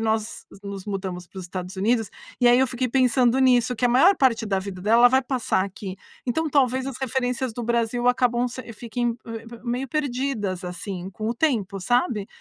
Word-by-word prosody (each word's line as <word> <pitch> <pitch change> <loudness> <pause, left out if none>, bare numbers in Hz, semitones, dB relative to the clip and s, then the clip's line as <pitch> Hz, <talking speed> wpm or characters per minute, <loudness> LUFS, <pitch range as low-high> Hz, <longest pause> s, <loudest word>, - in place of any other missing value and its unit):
nós 220 -1 -2 0.2
nos 200 -1 -7
mudamos 190 -3 -4
para 190 - -11
os 185 - -6
Estados 180 +1 -6
Unidos, 220 +2 +1 0.3
e 245 - +6
aí 240 +1 +6
eu 265 - +4
fiquei 250 0 -2
pensando 250 0 +3
nisso, 250 -2 +3
que 245 - -1
a - - +5
maior 280 +11 +5
parte 230 -4 +2
da 195 -2 +1
vida 190 -1 -6
dela, 225 +5 +4
ela 245 - +9
vai 260 +2 +3
passar 250 -7 0
aqui. 195 -1 -7 0.3
Então, 320 +6 0
talvez 260 -2 +2
as 270 -2 -5
referências 260 -1 -1
do 240 +2 -5
Brasil 235 +1 +1
acabam 245 -1 +2
se 245 -1 -8
fiquem 235 +1 -2
me 230 0 -7
me 235 0 -11
meio 250 +2 -2
perdidas, 250 - -2
assim, 180 +1 -6
com 215 +4 -4
o 235 - -1
tempo, 220 -9 0
sabe. 240 -1 +1
235 Hz, 205 wpm, -24 LUFS, 200-255 Hz, 0.3 s, ela